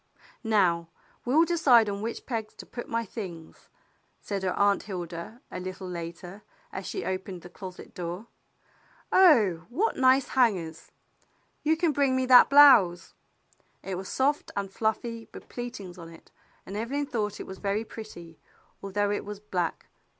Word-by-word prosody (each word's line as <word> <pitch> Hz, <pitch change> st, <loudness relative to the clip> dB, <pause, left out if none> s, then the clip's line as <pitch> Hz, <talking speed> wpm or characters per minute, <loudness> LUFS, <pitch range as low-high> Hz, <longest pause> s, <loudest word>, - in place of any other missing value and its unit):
"Now 180 Hz, -7 st, +2 dB, 0.4 s
we'll 300 Hz, +7 st, +4 dB
decide 275 Hz, -10 st, +5 dB
on 200 Hz, 0 st, -3 dB
which 230 Hz, +2 st, -5 dB
pegs 225 Hz, -4 st, -4 dB
to -, -, -10 dB
put 240 Hz, -, -8 dB
my 230 Hz, 0 st, -1 dB
things," 180 Hz, -7 st, -9 dB, 0.5 s
said 200 Hz, -2 st, -4 dB
her 185 Hz, -1 st, -1 dB
Aunt 200 Hz, 0 st, +3 dB
Hilda, 180 Hz, +3 st, -7 dB
a -, -, -5 dB
little 185 Hz, +1 st, -6 dB
later, 175 Hz, +2 st, -7 dB, 0.3 s
as 190 Hz, -, -6 dB
she -, -, -4 dB
opened 185 Hz, -1 st, -4 dB
the 175 Hz, -, -11 dB
closet 185 Hz, -2 st, -10 dB
door. 175 Hz, +4 st, -5 dB, 0.9 s
"Oh, 220 Hz, -, +5 dB
what 390 Hz, -, 0 dB
nice 260 Hz, +1 st, +4 dB
hangers! 185 Hz, -11 st, 0 dB, 0.7 s
You 315 Hz, +1 st, +2 dB
can 330 Hz, -1 st, +2 dB
bring 275 Hz, -2 st, +2 dB
me 260 Hz, 0 st, +1 dB
that 250 Hz, -1 st, +8 dB
blouse." 245 Hz, -12 st, +6 dB, 0.7 s
It 195 Hz, -, -5 dB
was 185 Hz, +1 st, -5 dB
soft 285 Hz, +3 st, 0 dB
and 195 Hz, -1 st, -3 dB
fluffy 225 Hz, +1 st, -2 dB
with -, -, -11 dB
pleatings 205 Hz, -7 st, -7 dB
on 165 Hz, -1 st, -9 dB
it, 165 Hz, -1 st, -16 dB, 0.3 s
and 195 Hz, -, -7 dB
Evelyn 265 Hz, +7 st, -2 dB
thought 215 Hz, -7 st, -3 dB
it -, -, -6 dB
was 190 Hz, -, -9 dB
very 205 Hz, +2 st, -1 dB
pretty, 175 Hz, -8 st, -10 dB, 0.4 s
although 205 Hz, +1 st, -1 dB
it 205 Hz, -, -2 dB
was 205 Hz, 0 st, -7 dB
black. 180 Hz, -5 st, -3 dB
205 Hz, 155 wpm, -27 LUFS, 180-245 Hz, 0.9 s, that